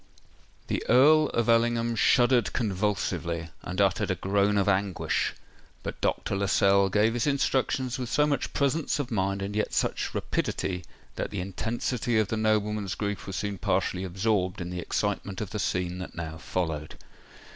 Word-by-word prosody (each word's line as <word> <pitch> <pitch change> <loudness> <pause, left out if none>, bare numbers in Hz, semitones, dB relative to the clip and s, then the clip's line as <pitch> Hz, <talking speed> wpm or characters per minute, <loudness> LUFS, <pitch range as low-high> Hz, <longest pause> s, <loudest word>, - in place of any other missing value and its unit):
The - - -2
Earl 150 +5 +6
of 115 -1 0
Ellingham 115 0 +2
shuddered 120 +2 +3
convulsively, 95 -6 -1
and 90 +1 -5
uttered 100 -3 +2
a - - +1
groan 100 +1 +1
of 100 - +2
anguish; 100 -1 0 0.5
but - - -6
Dr. - - 0
Lascelles 100 0 +3
gave 105 +3 +3
his 120 +3 0
instructions 135 -2 0
with 125 -2 -3
so 150 +3 +3
much 145 -3 -1
presence 140 +2 0
of 140 -3 -3
mind 100 -2 0
and 100 +1 -4
yet 105 - -1
such - - -1
rapidity, 90 -1 -2 0.3
that - - -2
the - - -4
intensity 115 +5 -2
of 110 -2 +2
the 110 - -1
nobleman's 105 -2 0
grief 105 -1 -3
was 95 - -4
soon 100 -2 -3
partially 90 +3 0
absorbed 95 0 0
in 90 0 -5
the 90 - -4
excitement 100 +1 -2
of 105 - -4
the 105 - -3
scene 90 -2 -1
that 90 - -7
now 80 -1 -5
followed. 80 -3 -3
105 Hz, 165 wpm, -27 LUFS, 95-115 Hz, 0.5 s, Earl